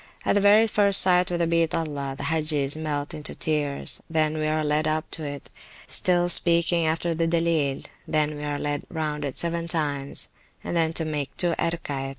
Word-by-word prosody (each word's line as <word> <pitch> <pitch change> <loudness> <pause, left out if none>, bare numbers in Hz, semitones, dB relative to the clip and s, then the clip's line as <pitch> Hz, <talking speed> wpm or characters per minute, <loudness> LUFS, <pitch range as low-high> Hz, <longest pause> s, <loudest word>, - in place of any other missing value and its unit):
At - - +3
the 205 - +2
very 205 +2 +6
first 200 -2 +5
sight 180 -1 +4
of 175 - -1
the 170 - +1
Beat 165 -1 +1
Allah, 145 -4 -3
the - - -5
Hagges 155 -3 +1
melt 150 -2 -3
into 150 - -5
tears, 145 -3 -2
then 155 -1 +1
we 155 0 -1
are 155 0 0
led 150 +1 0
up 155 +1 -1
to 160 - -3
it, 145 -2 -7 0.3
still 175 -1 +1
speaking 170 -1 +3
after 165 +2 0
the 165 0 0
Dilleel; 165 -5 0 0.2
then 155 -1 0
we 145 - -7
are 145 -1 -2
led 145 0 -2
round 155 -2 -3
it 140 -2 -4
seven 170 0 -2
times, 145 -4 -2 0.3
and - - -4
then 165 -1 +2
make 150 -3 -4
two 175 -2 +2
Erkaets. 145 -5 -2
155 Hz, 190 wpm, -25 LUFS, 150-170 Hz, 0.3 s, very